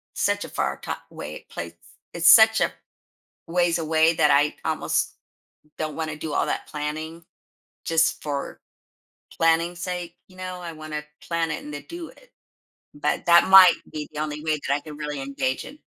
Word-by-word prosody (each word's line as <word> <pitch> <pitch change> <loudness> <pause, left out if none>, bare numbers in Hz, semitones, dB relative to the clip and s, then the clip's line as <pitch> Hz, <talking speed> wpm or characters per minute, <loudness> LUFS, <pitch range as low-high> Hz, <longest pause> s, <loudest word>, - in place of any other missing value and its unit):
such - - 0
a - - -10
far - - -2
top - - -5
way 75 +1 -8
place. 85 0 -6 0.4
It's 170 +1 +4
such 220 0 +8
a - - +2 0.8
ways 175 0 +1
away 160 +1 +3
that 150 - +4
I 145 +1 +3
almost - - -1 0.6
don't 155 -2 -3
want 160 -1 -3
to 150 - -6
do 155 0 -5
all - - +1
that - - -3
planning 155 +3 -5 0.6
just 165 0 +1
for 140 -2 -4 0.8
planning 165 +1 +2
sake, 175 -1 -5
you 185 -1 -19
know, 185 -1 -6
I 170 -1 -6
want 155 0 -9
to 150 0 -3 0.2
plan 165 -1 -1
it - - -5
and 150 - -8
then 145 - -7
do 340 -1 -7
it. - - -20 0.6
But 145 +1 -2
that 170 +2 +6
might 190 -2 +10 0.2
be 150 -1 -6
the 150 - -5
only 150 0 -4
way 155 -2 0
that 140 - +2
I - - -1
can 150 -2 -10
really 150 -2 -4
engage 135 -1 -2
in. 290 +3 -12
160 Hz, 185 wpm, -24 LUFS, 150-170 Hz, 0.8 s, might